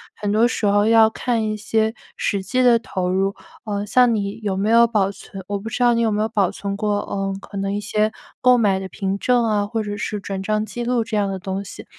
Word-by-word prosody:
很 205 Hz, -1 st, -2 dB
多 225 Hz, +3 st, +4 dB
时 225 Hz, -, -2 dB
候 205 Hz, +1 st, +3 dB
要 225 Hz, -1 st, +6 dB
看 230 Hz, 0 st, -1 dB
一 215 Hz, 0 st, -2 dB
些 220 Hz, +1 st, 0 dB, 0.2 s
实 200 Hz, -2 st, -1 dB
际 255 Hz, +7 st, 0 dB
的 240 Hz, -2 st, +6 dB
投 185 Hz, -5 st, -3 dB
入， 195 Hz, +1 st, 0 dB, 0.3 s
嗯， 205 Hz, -1 st, -2 dB
像 245 Hz, +1 st, +4 dB
你 200 Hz, -1 st, -3 dB
有 195 Hz, -2 st, -1 dB
没 200 Hz, +3 st, 0 dB
有 235 Hz, +1 st, +6 dB
保 200 Hz, -3 st, +1 dB
存 195 Hz, -1 st, -10 dB
我 200 Hz, 0 st, -2 dB
不 220 Hz, -, -8 dB
知 245 Hz, +2 st, -1 dB
道 240 Hz, -1 st, +5 dB
你 230 Hz, -, +1 dB
有 225 Hz, -2 st, +2 dB
没 210 Hz, +1 st, 0 dB
有 220 Hz, -, 0 dB
保 200 Hz, -5 st, +1 dB
存 200 Hz, 0 st, -5 dB
过， 210 Hz, -1 st, 0 dB
嗯， 195 Hz, -1 st, -2 dB
可 200 Hz, -, -9 dB
能 195 Hz, 0 st, -2 dB
一 205 Hz, -, -2 dB
些 215 Hz, +1 st, 0 dB, 0.3 s
购 250 Hz, 0 st, +5 dB
买 200 Hz, -4 st, +2 dB
的 190 Hz, -, -5 dB
凭 195 Hz, 0 st, -3 dB
证 245 Hz, +2 st, +2 dB
啊， 210 Hz, -2 st, +1 dB
或 220 Hz, +1 st, -2 dB
者 205 Hz, 0 st, -5 dB
是 210 Hz, 0 st, -3 dB
转 195 Hz, -1 st, -4 dB
账 215 Hz, +1 st, 0 dB
记 240 Hz, +2 st, -5 dB
录 240 Hz, -1 st, +1 dB
这 220 Hz, -2 st, -3 dB
样 200 Hz, -1 st, +1 dB
的 190 Hz, -1 st, -4 dB
东 195 Hz, +2 st, -4 dB
西？ -, -, -10 dB
210 Hz, 275 characters per minute, -21 LUFS, 200-225 Hz, 0.3 s, 要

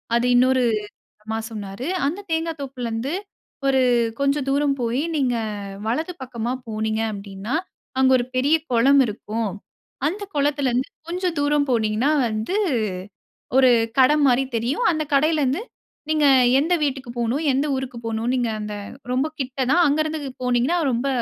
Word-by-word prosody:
அது 235 Hz, +1 st, +2 dB
இன்னொரு 255 Hz, +1 st, +4 dB, 0.7 s
மா 225 Hz, -, -1 dB
சொன்னாரு. 210 Hz, +2 st, -6 dB, 0.2 s
அந்த 350 Hz, +8 st, -2 dB
தேங்கா 325 Hz, 0 st, 0 dB
தோப்புலருந்து 250 Hz, -2 st, -4 dB, 0.6 s
ஒரு 265 Hz, -1 st, +3 dB, 0.4 s
கொஞ்சம் 280 Hz, 0 st, +1 dB
தூரம் 280 Hz, 0 st, +2 dB
போயி 240 Hz, +4 st, 0 dB
நீங்க 250 Hz, -4 st, +1 dB, 0.5 s
வலது 315 Hz, +10 st, -1 dB
பக்கமா 240 Hz, -1 st, -3 dB, 0.2 s
போனீங்க 220 Hz, 0 st, -1 dB
அப்படீன்னா, 200 Hz, +4 st, -6 dB, 0.4 s
அங்க 265 Hz, 0 st, +5 dB
1 245 Hz, -, -1 dB
பெரிய 285 Hz, +5 st, +4 dB, 0.2 s
கொளம் 270 Hz, +4 st, +5 dB
இருக்கும். 215 Hz, 0 st, -3 dB, 0.6 s
அந்த 400 Hz, +5 st, -5 dB
குளத்துலருந்து 280 Hz, -3 st, +1 dB, 0.2 s
கொஞ்சம் 355 Hz, -1 st, -2 dB
தூரம் 290 Hz, 0 st, +2 dB
போனீங்கன்னா 225 Hz, +3 st, +1 dB, 0.2 s
வந்து, 220 Hz, -, -2 dB, 1.0 s
1 260 Hz, -1 st, +6 dB, 0.3 s
கடை 265 Hz, +3 st, +6 dB
மாரி 265 Hz, +1 st, +3 dB
தெரியும். 245 Hz, -, 0 dB
அந்த 310 Hz, -1 st, -1 dB
கடையிலருந்து 295 Hz, +1 st, +2 dB, 0.5 s
நீங்க 305 Hz, -2 st, +3 dB, 0.3 s
எந்த 330 Hz, +5 st, +2 dB
வீட்டுக்கு 265 Hz, -3 st, -3 dB
போகணும், 240 Hz, +7 st, 0 dB
எந்த 275 Hz, +3 st, +1 dB
ஊருக்கு 260 Hz, -2 st, -5 dB
போகணும்ன்னு, 225 Hz, +2 st, -1 dB
நீங்க 240 Hz, -2 st, 0 dB
அந்த 210 Hz, 0 st, -5 dB, 0.4 s
ரொம்ப 260 Hz, +3 st, +1 dB
கிட்ட 260 Hz, 0 st, -4 dB
தான். 350 Hz, -, +5 dB
அங்கருந்து 310 Hz, +2 st, 0 dB, 0.2 s
போனீங்கன்னா 250 Hz, +7 st, +2 dB
ரொம்ப 245 Hz, +4 st, -1 dB
260 Hz, 135 wpm, -22 LUFS, 235-290 Hz, 1.0 s, 1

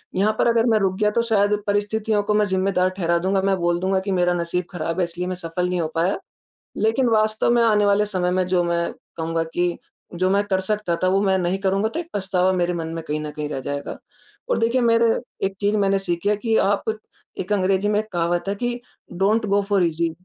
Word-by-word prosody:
यहाँ 210 Hz, +3 st, +2 dB
पर -, -, +3 dB
अगर 230 Hz, 0 st, +3 dB
मैं 220 Hz, -1 st, +3 dB
रुक 190 Hz, -1 st, 0 dB
गया 210 Hz, 0 st, +2 dB
तो -, -, +5 dB
शायद 210 Hz, -3 st, +2 dB
परिस्थितियों 205 Hz, +1 st, 0 dB
को 210 Hz, +1 st, 0 dB
मैं 210 Hz, 0 st, +3 dB
ज़िम्मेदार 185 Hz, -1 st, +1 dB
ठहरा 170 Hz, -1 st, +1 dB
दूँगा। 190 Hz, +2 st, +1 dB
मैं 195 Hz, 0 st, +2 dB
बोल 175 Hz, 0 st, 0 dB
दूँगा 190 Hz, +1 st, +1 dB
कि -, -, 0 dB
मेरा 180 Hz, -1 st, +2 dB
नसीब 175 Hz, +1 st, -2 dB
ख़राब 165 Hz, 0 st, -3 dB
है -, -, +3 dB
इसलिए 175 Hz, +1 st, -4 dB
मैं 185 Hz, -, -3 dB
सफल 180 Hz, +1 st, -3 dB
नहीं 180 Hz, -1 st, 0 dB
हो 160 Hz, -, -1 dB
पाया। 175 Hz, +4 st, +1 dB, 0.6 s
लेकिन 225 Hz, +4 st, +2 dB
वास्तव 215 Hz, 0 st, +2 dB
में 240 Hz, -1 st, +4 dB
आने 210 Hz, -2 st, +3 dB
वाले 205 Hz, +1 st, +3 dB
समय 185 Hz, -3 st, -1 dB
में 185 Hz, 0 st, +1 dB
जो 180 Hz, -1 st, +2 dB
मैं 170 Hz, 0 st, -1 dB, 0.2 s
कहूँगा 165 Hz, 0 st, -1 dB
कि 175 Hz, 0 st, 0 dB, 0.4 s
जो 185 Hz, +2 st, +1 dB
मैं 200 Hz, +1 st, +3 dB
कर 190 Hz, -2 st, 0 dB
सकता 195 Hz, -3 st, -1 dB
था 185 Hz, -, +3 dB
वो 195 Hz, +1 st, +2 dB
मैं 190 Hz, -1 st, +2 dB
नहीं 180 Hz, +2 st, 0 dB
करूँगा 195 Hz, +2 st, +1 dB
तो 330 Hz, -, -4 dB
एक 335 Hz, -, -9 dB
पछतावा 190 Hz, -1 st, +1 dB
मेरे 175 Hz, -1 st, 0 dB
मन 165 Hz, -1 st, -4 dB
में 165 Hz, -, -4 dB
कहीं 150 Hz, 0 st, -3 dB
न 150 Hz, -, -5 dB
कहीं 150 Hz, 0 st, -5 dB
रह 135 Hz, -, -4 dB
जाएगा। 145 Hz, +1 st, -5 dB, 0.5 s
और -, -, +1 dB
देखिए 235 Hz, +3 st, +2 dB
मेरे 230 Hz, -1 st, +4 dB, 0.4 s
एक 195 Hz, 0 st, -5 dB
चीज़ 205 Hz, +1 st, +1 dB
मैंने 195 Hz, -1 st, +2 dB
सीखी 180 Hz, 0 st, -2 dB
है 210 Hz, -, +2 dB
कि 225 Hz, +1 st, 0 dB
आप 200 Hz, +1 st, +2 dB, 0.5 s
एक 190 Hz, +3 st, -3 dB
अंग्रेजी 195 Hz, +1 st, +1 dB
में 210 Hz, 0 st, +2 dB
एक 215 Hz, -, -8 dB
कहावत 175 Hz, 0 st, 0 dB
है 200 Hz, -, 0 dB
कि 240 Hz, +3 st, -3 dB, 0.4 s
डोंट 215 Hz, +3 st, +2 dB
गो 200 Hz, 0 st, +2 dB
फोर 195 Hz, -3 st, +3 dB
ईज़ी, 165 Hz, 0 st, 0 dB
190 Hz, 235 wpm, -22 LUFS, 175-210 Hz, 0.6 s, तो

